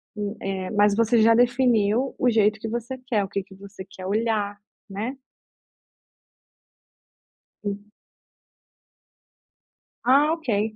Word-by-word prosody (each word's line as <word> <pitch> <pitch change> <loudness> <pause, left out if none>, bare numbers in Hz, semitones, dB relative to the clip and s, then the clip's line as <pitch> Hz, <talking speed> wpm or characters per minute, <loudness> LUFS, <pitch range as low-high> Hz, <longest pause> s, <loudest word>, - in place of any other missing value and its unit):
e 205 +1 -4
eh, 190 -1 -4
mas 205 -1 +3
você 230 0 +3
já 230 +1 +6
definiu 245 -1 +2
o 250 - +2
jeito 215 -1 +2
que 225 - -5
você 240 +3 -4
quer, 215 -5 +1
o - - -4
que 200 -1 -3
que 190 - -16
você 195 -1 -11
quer 185 -1 -10
olhar, 210 0 -1 0.3
né? 220 +7 -4 2.5
Sim. 205 0 -6 2.1
Ah, 285 +5 +5
ok. 220 -9 -1
215 Hz, 115 wpm, -24 LUFS, 200-240 Hz, 2.5 s, já